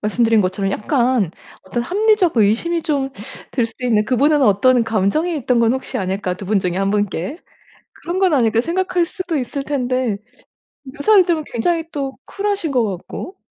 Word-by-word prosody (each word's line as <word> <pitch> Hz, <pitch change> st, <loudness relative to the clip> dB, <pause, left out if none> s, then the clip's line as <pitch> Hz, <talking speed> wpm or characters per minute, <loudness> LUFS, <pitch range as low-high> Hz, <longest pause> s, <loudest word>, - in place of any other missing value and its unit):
말씀드린 225 Hz, +1 st, +2 dB
것처럼 195 Hz, +1 st, -1 dB
약간 240 Hz, -, +1 dB, 0.3 s
어떤 195 Hz, +6 st, -3 dB
합리적 395 Hz, -, +2 dB
의심이 235 Hz, +12 st, +2 dB
좀 275 Hz, -3 st, -1 dB, 0.4 s
들 240 Hz, -4 st, 0 dB
수도 250 Hz, +2 st, -10 dB
있는 215 Hz, -3 st, +2 dB
그분은 285 Hz, +4 st, +3 dB
어떤 245 Hz, +3 st, +4 dB
감정이 225 Hz, -, 0 dB
있던 250 Hz, -3 st, +1 dB
건 230 Hz, 0 st, +3 dB
혹시 265 Hz, -, -4 dB
아닐까 190 Hz, -1 st, -2 dB
2 190 Hz, +1 st, -9 dB
분 210 Hz, 0 st, +2 dB
중에 180 Hz, -2 st, -2 dB
1 195 Hz, +1 st, +1 dB
분께 205 Hz, -, -1 dB, 0.6 s
그런 350 Hz, +2 st, -5 dB
건 370 Hz, -5 st, +3 dB
아닐까 230 Hz, -3 st, +3 dB
생각할 360 Hz, +2 st, 0 dB
수도 360 Hz, -3 st, -4 dB
있을 275 Hz, +2 st, -3 dB
텐데 255 Hz, -6 st, -1 dB, 0.7 s
묘사를 310 Hz, +9 st, +3 dB
들으면 325 Hz, -3 st, 0 dB
굉장히 325 Hz, +8 st, 0 dB
또 275 Hz, -2 st, -4 dB
쿨하신 400 Hz, -6 st, -2 dB
것 245 Hz, -3 st, +2 dB
같고. 375 Hz, -, -8 dB
255 Hz, 335 characters per minute, -19 LUFS, 215-325 Hz, 0.7 s, 어떤